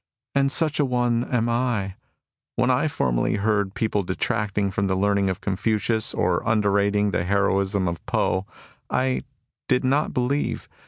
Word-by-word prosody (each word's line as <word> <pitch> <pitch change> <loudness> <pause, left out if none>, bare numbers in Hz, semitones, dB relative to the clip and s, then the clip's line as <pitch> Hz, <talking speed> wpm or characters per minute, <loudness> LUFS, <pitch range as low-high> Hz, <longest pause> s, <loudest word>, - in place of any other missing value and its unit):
And 140 0 +2
such 155 -2 0
a - - +4
one 120 -2 +1
am 120 -2 0
I. 115 -5 0 0.3
" - - -68
\\nien - - +2
formerly 60 +10 0
I - - -4
heard 100 -2 0
people 110 -2 0
detracting 100 +1 -1
from 100 +1 0
the 95 - +1
learning 100 0 +2
of 95 - -2
C!onfucius 110 +2 0
or - - +1
underrating 100 -1 +2
the 85 - 0
heroism 100 0 +1
of 85 -1 -4
Poh 95 +1 0 0.4
I, - - 0
I 130 -1 -1 0.4
did 125 0 +2
not 140 +4 +1
believe. 130 +4 -1
105 Hz, 160 wpm, -24 LUFS, 100-120 Hz, 0.4 s, a